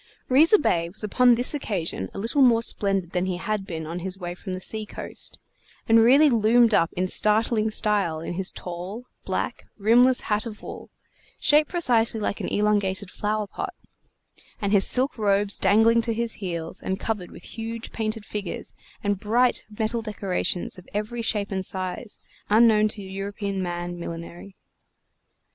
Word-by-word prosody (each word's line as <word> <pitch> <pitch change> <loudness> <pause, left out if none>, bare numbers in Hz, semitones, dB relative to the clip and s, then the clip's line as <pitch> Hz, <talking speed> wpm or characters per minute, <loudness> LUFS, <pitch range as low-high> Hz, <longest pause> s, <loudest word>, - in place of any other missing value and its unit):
Riza 315 +11 +6
Bey 170 - 0
was 190 - -3
upon 245 +4 +4
this 245 +5 +2
occasion 175 - -3
a - - -6
little 230 +8 0
more 235 -3 +5
splendid 195 -5 0
than 180 0 -1
he 180 -1 -2
had 210 0 -3
been 160 -4 -5
on 165 +3 -5
his 185 +1 -3
way 175 -2 -5
from 185 +1 -7
the 185 - -4
sea 215 +3 -2
coast, 210 - -3 0.5
and 225 0 +6
really 265 +7 +6
loomed 230 -1 +4
up 165 -4 +3
in 185 +1 -1
startling 215 +2 +2
style 205 -7 +1
in 165 - -5
his 190 +1 0
tall, 180 +7 -7 0.2
black, - - -3
rimless 240 +5 +4
hat 210 +2 -1
of 210 -2 -10
wool, - - -9 0.5
shaped 300 +1 +4
precisely 235 -9 +1
like 205 - -2
an - - -3
elongated 205 -2 0
flower 210 0 -2
pot, 200 - -6 0.8
and 200 -1 -1
his 200 -2 +4
silk 260 +1 +1
robes 200 -1 +2
dangling 225 +2 +4
to 230 -1 -2
his 235 0 -1
heels 170 -3 -4
and 190 +1 -3
covered 210 -6 -3
with - - -13
huge 230 0 -6
painted 220 -1 -3
figures 200 -4 -5 0.3
and 205 -2 0
bright 240 +5 +2
metal 225 +1 0
decorations 190 -4 -2
of 180 - -17
every 215 +3 -3
shape 210 -3 -1
and 190 -1 -2
size 185 +4 -2 0.3
unknown, 215 0 +5
to 210 -1 -5
European 195 +1 -4
man 175 0 -4
millinery. 170 +3 -8
210 Hz, 165 wpm, -24 LUFS, 185-230 Hz, 0.8 s, Riza